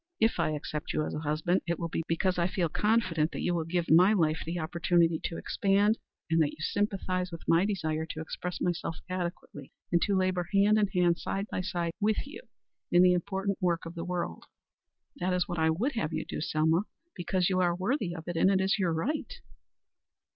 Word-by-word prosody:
If 225 -4 +2
I 165 -2 +2
accept 150 0 -4
you 155 - 0
as - - -5
a - - -3
husband, 155 +4 0
it 170 - 0
will 170 - -3
be 165 - -2
because 180 +2 0
I 170 - +3
feel 180 -2 -1
confident 185 -6 +1
that - - -4
you 175 - +1
will 165 -2 -1
give 170 0 -1
my 180 +6 +7
life 160 -5 +2
the 170 +2 -4
opportunity 170 0 +2
to 165 - -3
expand, 205 +3 +2 0.3
and 165 0 +3
that 150 - +3
you - - -11
sympathize 185 0 -1
with 165 - -9
my 165 +3 +4
desire 160 -6 -2
to 155 - -6
express 175 +2 -5
myself 170 -2 -2
adequately 175 -6 -5 0.2
and 170 -1 +3
to 200 - +1
labor 185 -2 0
hand 210 +2 +5
in 210 - +3
hand, 180 -3 +2
side 195 +1 -2
by - - -1
side, 170 -2 -2
with 215 +2 +1
you 285 +9 -9 0.5
in 175 +1 +6
the 180 0 +6
important 195 +2 -2
work 175 -2 0
of 165 - -7
the 170 -1 -5
world." 175 - -4 0.7
"That 180 +1 0
is 180 -1 +1
what 175 - -3
I 160 0 +3
would 210 - 0
have 225 - -2
you 155 - -2
do, - - -5
Selma. 160 +5 +1 0.3
Because 180 +1 0
you 185 - +2
are 175 -1 +2
worthy 185 -1 -1
of 160 - -7
it, 175 - -3
and 165 - +4
because 195 -1 +3
it - - +1
is 195 +3 +1
your 180 -4 +1
right." 275 - -2
175 Hz, 220 wpm, -29 LUFS, 165-190 Hz, 0.7 s, my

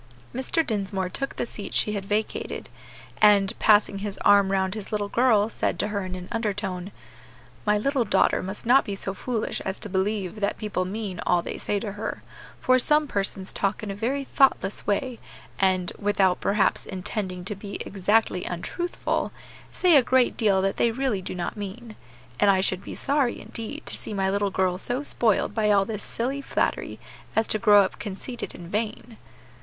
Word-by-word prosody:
Mr. 290 +6 0
Dinsmore 195 -4 -1
took 275 +8 -2
the - - -2
seat 210 -3 -6
she 210 - +3
had 200 -2 -3
vacated, 210 +2 -2 0.5
and, 205 -1 +5
passing 205 -2 +4
his 200 -1 -4
arm 200 -1 +6
round 190 -1 +1
his 215 -2 -6
little 205 -1 -1
girl, 225 -4 +4
said 225 - -1
to 205 - -1
her 205 -2 -2
in 185 0 -5
an 180 -1 -7
undertone, 200 -4 -2 0.8
"My 210 0 +4
little 270 +4 +1
daughter 210 - +2
must 190 +5 -6
not 260 +4 +6
be 200 - -4
so 195 0 -3
foolish 225 +2 -3
as 190 0 -3
to 210 - -8
believe 195 +1 -1
that 200 -1 0
people 205 -4 -2
mean 195 -1 -4
all 175 -1 +3
they - - -5
say 205 - -1
to 215 -3 -3
her; 205 +2 -5 0.4
for 255 0 +4
some 300 +4 +3
persons 195 -3 -2
talk 195 +2 -1
in 205 - -3
a - - -5
very 260 +7 -1
thoughtless 265 -8 +2
way, 235 +4 -1 0.4
and, 185 -2 +2
without 195 -3 +2
perhaps 200 0 +1
intending 185 -1 -4
to 210 - -2
be 200 0 -8
exactly 200 -1 +1
untruthful, 345 - -2 0.4
say 360 -3 +4
a 280 - +8
great 255 0 +3
deal 200 -4 +2
that 195 - 0
they 235 - +3
really 235 -4 -1
do 185 - -5
not 175 -1 -3
mean. 215 +3 -7 0.4
And 205 - +5
I 190 -1 +5
should 185 0 0
be - - -7
sorry, 275 -4 +1
indeed, 225 -1 -7
to - - -2
see 210 - -5
my 190 -1 +1
little 200 0 +1
girl 185 -1 0
so 245 +7 -2
spoiled 225 -7 +1
by 215 -2 +1
all 200 -1 +4
this 210 -1 -5
silly 265 +4 -2
flattery - - -1 0.4
as 220 - +3
to 215 - +2
grow 205 -2 +7
up 190 - -4
conceited 215 +5 -6
and 175 - -9
vain." 220 +1 -3
205 Hz, 190 wpm, -25 LUFS, 195-225 Hz, 0.8 s, a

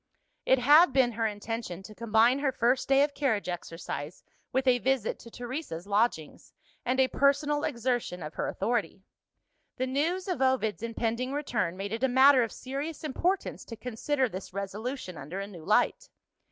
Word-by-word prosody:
It 265 - +5
had 290 +4 +6
been 260 -3 +4
her 225 0 0
intention 210 -3 -5
to 215 - -11
combine 230 +4 +3
her 280 -2 +1
first 250 +1 +1
day 275 +1 +6
of 290 0 -1
carriage 225 -11 0
exercise 165 -3 -6 0.3
with 265 +1 0
a 250 -1 +4
visit 260 -3 0
to 230 - -12
Teresa's 240 - -6
lodgings, 200 -6 -1 0.3
and 255 +2 0
a 260 - +5
personal 290 +2 +2
exertion 235 -7 -2
of 150 +1 -7
her - - -2
authority. 215 -5 -2 0.7
The 255 - 0
news 320 +9 -1
of 360 -7 -2
Ovid's 260 -6 +1
impending 230 +2 -2
return 225 - -1
made 195 +2 -4
it 230 +3 -3
a - - +5
matter 260 +1 +6
of 230 - -1
serious 280 +5 -5
importance 350 +6 -1
to 230 - -8
consider 250 +4 -1
this 190 -4 -8
resolution 200 - -5
under 155 +8 -6
a 200 - -3
new 180 -5 -11
light. 355 - +1
245 Hz, 170 wpm, -29 LUFS, 205-270 Hz, 0.7 s, had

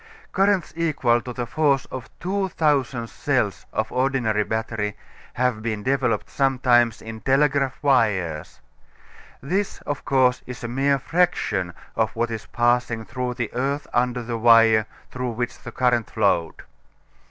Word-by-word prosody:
Currents 195 -2 +1
equal 140 -8 +1
to 125 - -7
the 120 0 -4
force 140 +1 +1
of 130 -2 -7
2,000 155 -10 0
cells - - -1
of 110 0 -2
ordinary 125 -5 +1
battery 110 -1 -3 0.4
have 125 -2 0
been 110 -2 -3
developed 130 -5 0
sometimes 125 -4 +2
in 110 0 -8
telegraph 135 -1 +2
wires. 100 - +1 0.8
This 190 +8 -1
of 145 -1 -4
course 130 -2 +2
is 125 0 -8
a - - -2
mere 135 +3 +1
fraction 135 - 0 0.2
of 110 -2 0
what 115 +1 -1
is 110 -2 -6
passing 120 -1 +1
through 125 +1 -4
the 120 -3 -4
earth 140 +3 -1
under 125 0 +1
the 115 0 -4
wire 115 -1 +5 0.2
through 125 -1 -3
which 120 +1 -4
the 120 - -9
current 120 -2 +1
flowed. 100 -6 0
125 Hz, 140 wpm, -23 LUFS, 115-135 Hz, 0.8 s, wire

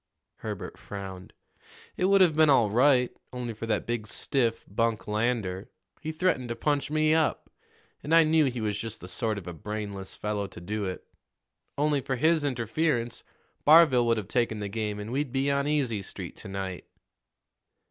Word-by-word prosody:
Herbert - - -6
frowned. 95 -2 -8 0.6
"It 180 - 0
would 195 0 +5
have 170 -5 +5
been 155 -1 +5
all 120 -7 +4
right, 125 +1 +4 0.2
only 125 -2 -4
for 115 +1 -6
that 110 - 0
big 115 -2 -3
stiff, 115 +1 0
Bunk 115 +2 -1
Lander. 105 -3 -1 0.3
He 155 0 -3
threatened 155 -7 0
to 120 - -2
punch 145 0 0
me 155 0 +3
up, 160 -1 0 0.5
and 150 - -6
I 165 0 +7
knew 155 0 +4
he 125 -3 -2
was 105 -1 -1
just 115 0 -6
the 90 - -9
sort 110 +3 -2
of 100 - -7
a 90 - -6
brainless 100 +2 -6
fellow 105 -1 -2
to 95 - -11
do 105 +4 -3
it. 90 -1 -5 0.7
Only 145 -1 +2
for 130 - -2
his 155 +4 +3
interference, 125 0 -1 0.4
Barville 150 -6 +6
would 115 -1 +3
have 105 -3 -4
taken 115 -1 0
the 105 -1 -4
game, 105 -1 -2
and 105 +2 -6
we'd 135 0 -1
be 135 +2 +1
on 140 0 +1
Easy 130 -8 0
Street - - -8
to - - -9
night." 95 -2 -5
120 Hz, 180 wpm, -28 LUFS, 105-145 Hz, 0.7 s, I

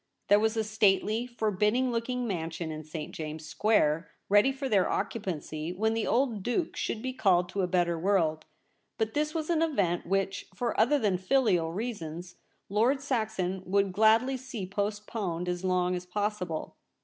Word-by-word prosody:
There 205 +1 +7
was 220 +1 +1
a 220 - +2
stately, 215 +2 +2
forbidding 220 +2 +1
looking 245 +1 -2
mansion 165 -4 -3
in 155 0 -6
St. 155 0 -7
James's 155 0 -6
Square 165 -7 +2 0.2
ready 205 +6 +5
for 270 0 -4
their 200 -7 +3
occupancy 165 -6 -3
when 220 +5 0
the 225 -1 -1
old 240 -4 +1
Duke 245 - -1
should 220 - -3
be 255 0 -2
called 180 -7 +3
to 200 - -2
a 180 - +1
better 175 -2 +1
world; 160 -4 +1 0.5
but 220 -1 -1
this 300 +2 -1
was 320 +1 -1
an 325 -2 +2
event 200 - 0
which, 195 +1 -1
for 240 -3 -1
other 250 +7 +4
than 200 -8 +1
filial 185 -6 +2
reasons, 180 -5 -5 0.3
Lord 230 +7 +2
Saxon 220 -9 -1
would 195 0 +2
gladly 225 +6 +4
see 245 -6 -6
postponed 200 -3 -3
as 180 0 -2
long 180 -1 +1
as 180 0 -6
possible. 195 -4 -3
205 Hz, 165 wpm, -29 LUFS, 180-230 Hz, 0.5 s, There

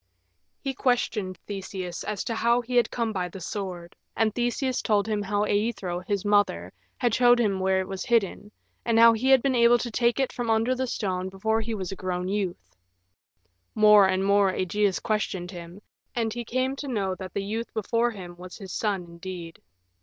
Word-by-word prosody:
He 270 - -3
questioned 225 -7 0
Theseus 190 -3 -5
as 205 -2 -3
to 230 - -3
how 235 +2 +2
he 245 +1 -5
had 240 -2 +4
come 230 -2 -2
by 180 -2 -2
the 190 - -9
sword, 180 -2 -6 0.2
and 220 -2 +2
Theseus 245 +2 -1
told 205 -2 +2
him 210 -2 0
how 205 +1 0
Aethra 205 -5 -1
his 200 -1 -1
mother, 205 - +2 0.2
had 240 -3 +1
shown 245 0 +5
him 205 -5 +1
where 190 0 +2
it 185 - -5
was 195 -1 -5
hidden, 210 -3 0 0.3
and 230 -1 +1
how 230 0 +8
he 240 +4 0
had 265 -2 +6
been 275 -1 +2
able 240 0 +5
to 240 0 -4
take 235 +3 +1
it 265 - 0
from 240 -2 -3
under 225 +3 +2
the 260 0 -2
stone 185 -5 -2
before 220 +4 0
he 225 0 -3
was 190 -2 -4
grown 185 -1 -3
a - - -2
youth. 190 - -3 1.0
More 210 -2 +7
and 190 0 0
more 200 -1 +4
Ægeus 190 +2 0
questioned 195 -4 -2
him, 175 +1 -9 0.4
and 225 -2 0
he 240 0 -5
came 255 +3 -1
to 285 - -5
know 200 -7 -1
that 185 0 -8
the 200 - -1
youth 225 +3 -4
before 230 +2 +1
him 185 -6 -9
was 180 0 -10
his 190 -3 -9
son 200 -4 -1
indeed. 170 0 -9
205 Hz, 200 wpm, -26 LUFS, 185-235 Hz, 1.0 s, how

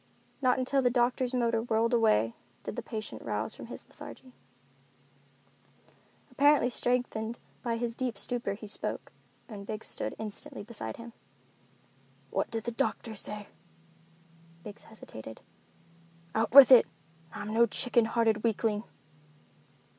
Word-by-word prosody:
Not 255 -1 +3
until 260 +1 +1
the 250 - +4
doctor's 245 +1 +1
motor 235 -3 +1
whirled 230 +1 +1
away 115 - +3 0.3
did - - -5
the - - -3
patient 215 -2 -6
rouse - - -2
from - - -9
his - - -9
lethargy. 255 -1 -12 2.0
Apparently 280 -1 +4
strengthened 240 -2 -1 0.2
by 235 -2 -1
his 235 0 -2
deep 245 -3 -3
stupor 235 0 -2
he 215 - -10
spoke, 205 - -4 0.4
and 200 -2 -9
Biggs 215 0 -4
stood - - -4
instantly 215 -1 -6
beside 225 0 -6
him. 235 0 -10 1.2
"What - - 0
did 225 -1 -3
the 240 - -2
doctor 235 -2 -2
say?" 210 0 -3 1.1
Biggs 205 +2 -10
hesitated. 110 - -10 0.9
"Out 220 +1 +1
with 270 0 +10
it, 250 - +9 0.4
I'm 210 +1 -5
no 235 +1 +5
chicken 235 +1 +2
hearted 225 -2 +1
weakling." 220 -1 0
230 Hz, 130 wpm, -30 LUFS, 215-245 Hz, 2.0 s, with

